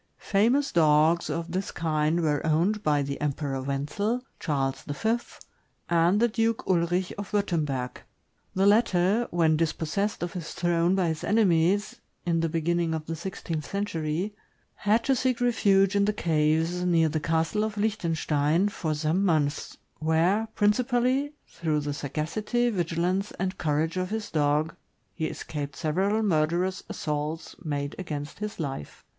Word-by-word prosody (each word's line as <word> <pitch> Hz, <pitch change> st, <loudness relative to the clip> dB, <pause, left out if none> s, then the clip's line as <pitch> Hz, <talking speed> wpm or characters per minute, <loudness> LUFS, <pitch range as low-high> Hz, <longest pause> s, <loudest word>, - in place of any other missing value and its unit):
Famous 240 Hz, +8 st, +2 dB
dogs 160 Hz, +1 st, +4 dB
of 165 Hz, 0 st, -3 dB
this 190 Hz, +2 st, -2 dB
kind 155 Hz, +1 st, 0 dB
were 150 Hz, -3 st, +1 dB
owned 170 Hz, +7 st, +1 dB
by 150 Hz, -5 st, +2 dB
the 140 Hz, +1 st, -5 dB
Emperor 140 Hz, -2 st, -2 dB
Wenzel, 150 Hz, -, -2 dB, 0.2 s
Charles 135 Hz, -4 st, -1 dB
V., 220 Hz, +11 st, 0 dB, 0.7 s
and 170 Hz, +4 st, +3 dB
the 235 Hz, -, +4 dB
Duke 225 Hz, 0 st, 0 dB
Ulrich 175 Hz, 0 st, +1 dB
of 205 Hz, -, -6 dB
Wurtemberg. 155 Hz, -11 st, -1 dB, 0.5 s
The 190 Hz, +1 st, +3 dB
latter, 205 Hz, +1 st, +3 dB
when 165 Hz, -2 st, +3 dB
dispossessed 165 Hz, +5 st, -1 dB
of 175 Hz, -, -4 dB
his 170 Hz, -3 st, -6 dB
throne 175 Hz, +1 st, +2 dB
by 185 Hz, -3 st, +1 dB
his 160 Hz, -1 st, -3 dB
enemies, 205 Hz, +2 st, +2 dB, 0.3 s
in 170 Hz, -1 st, +1 dB
the 165 Hz, 0 st, 0 dB
beginning 165 Hz, +1 st, 0 dB
of 155 Hz, -1 st, -5 dB
the 165 Hz, -, -4 dB
sixteenth 165 Hz, -3 st, -5 dB
century, 185 Hz, -1 st, -2 dB, 0.4 s
had 215 Hz, +3 st, +1 dB
to 270 Hz, -, +2 dB
seek 255 Hz, -1 st, 0 dB
refuge 205 Hz, -5 st, +3 dB
in 200 Hz, 0 st, +4 dB
the 210 Hz, -, +1 dB
caves, 160 Hz, +1 st, +1 dB
near 170 Hz, -2 st, +3 dB
the 155 Hz, 0 st, -1 dB
Castle 165 Hz, +6 st, 0 dB
of 215 Hz, -1 st, -3 dB
Lichtenstein, 170 Hz, -4 st, +1 dB
for 160 Hz, -6 st, -2 dB
some 155 Hz, +5 st, 0 dB
months, 155 Hz, -6 st, 0 dB, 0.2 s
where, 170 Hz, +8 st, +2 dB
principally 250 Hz, +6 st, +2 dB
through 155 Hz, -3 st, -1 dB
the 145 Hz, 0 st, -3 dB
sagacity, 185 Hz, -, -1 dB
vigilance, 180 Hz, +1 st, -1 dB
and 190 Hz, +1 st, -3 dB
courage 160 Hz, +2 st, 0 dB
of 185 Hz, 0 st, -1 dB
his 220 Hz, 0 st, -4 dB
dog, 150 Hz, +1 st, +1 dB, 0.4 s
he 160 Hz, -2 st, -2 dB
escaped 145 Hz, -3 st, -5 dB
several 190 Hz, +9 st, 0 dB
murderous 175 Hz, +1 st, +1 dB
assaults 150 Hz, +1 st, -3 dB
made 145 Hz, -3 st, -3 dB
against 150 Hz, -4 st, -5 dB
his 210 Hz, -2 st, -5 dB
life. 135 Hz, -, -5 dB
170 Hz, 145 wpm, -27 LUFS, 155-205 Hz, 0.7 s, dogs